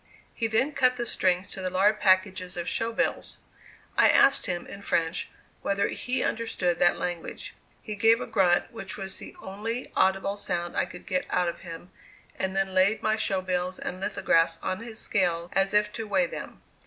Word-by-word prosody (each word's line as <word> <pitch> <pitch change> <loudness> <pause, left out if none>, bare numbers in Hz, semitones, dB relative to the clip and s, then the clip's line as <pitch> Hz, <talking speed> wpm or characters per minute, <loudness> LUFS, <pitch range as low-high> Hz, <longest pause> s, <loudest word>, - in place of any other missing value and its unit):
He 225 - -1
then 225 +7 +1
cut 255 -3 +3
the 240 -1 -3
strings 185 -3 +1
to 190 - -7
the 185 - -1
large 200 +4 +3
packages 185 -1 +2
of 175 0 -3
show 230 0 0
bills. 225 - -1 0.6
I - - +6
asked 275 -4 +5
him, 175 -2 -2
in 200 - -9
French, 165 -3 0 0.3
whether 200 0 0
he 255 +1 -2
understood 180 -6 -1
that 175 - +4
language. 175 -2 -5 0.3
He 215 - -5
gave 225 +3 +4
a - - -3
grunt, 180 -4 +2
which 195 -4 -5
was 195 -1 -6
the - - -10
only 220 +6 -5
audible 195 +1 +2
sound 175 -3 -3
I - - +2
could 175 - -11
get 185 -2 -1
out 180 -1 +1
of 170 - -7
him, 170 +1 -9 0.4
and 190 0 -2
then 195 -1 0
laid 190 +3 +3
my 215 0 +2
show 195 -3 +1
bills 185 0 -2
and 185 - -5
lithographs 165 -4 +2
on 185 0 -2
his 230 -1 -8
scales 175 -6 0
as 195 +1 +2
if 210 0 +2
to 225 -2 -5
weigh 190 -3 +2
them. - - -8
190 Hz, 190 wpm, -27 LUFS, 180-215 Hz, 0.6 s, I